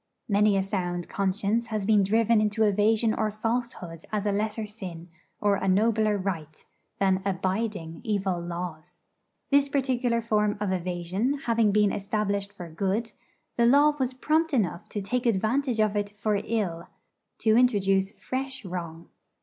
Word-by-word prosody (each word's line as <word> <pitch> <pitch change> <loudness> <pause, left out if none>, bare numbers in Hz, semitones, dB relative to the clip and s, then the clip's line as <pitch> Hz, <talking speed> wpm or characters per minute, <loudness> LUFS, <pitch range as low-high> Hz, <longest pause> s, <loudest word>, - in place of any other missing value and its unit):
Many 205 -1 +3
a 190 - +1
sound 175 -3 -3
conscience 200 +4 0
has 215 -3 -2
been 210 -1 +4
driven 220 +2 +3
into 215 +1 +1
evasion 215 +2 +3
or 215 -1 0
falsehood 215 -6 -3
as 210 -1 -1
a 205 - +2
lesser 215 +2 -1
sin, 180 -5 -8 0.3
or 205 -1 +2
a 195 - -2
nobler 215 +2 +3
right, 165 -6 -5 0.3
than 190 -1 +2
'abiding' 190 -3 -2
evil 195 -4 -1
laws. 170 -2 -7 0.5
This 280 0 +4
particular 255 -4 +1
form 210 -2 +1
of 205 -2 -1
evasion 185 +9 -1
having 230 -3 +3
been 210 -1 +3
established 200 0 -2
for 180 -4 -9
good, 195 +7 -2 0.5
the 235 -1 +4
Law 290 +4 +5
was 260 -1 -1
prompt 315 +3 +1
enough 185 -7 -1
to 205 - -4
take 245 +5 -1
advantage 235 +4 +1
of 215 -1 +2
it 205 0 -1
for 205 0 -1
ill, 190 -7 -2 0.5
to 220 -1 +3
introduce 195 -6 +3
fresh 260 +2 -5
wrong. 170 -2 -6
210 Hz, 150 wpm, -27 LUFS, 190-230 Hz, 0.5 s, Law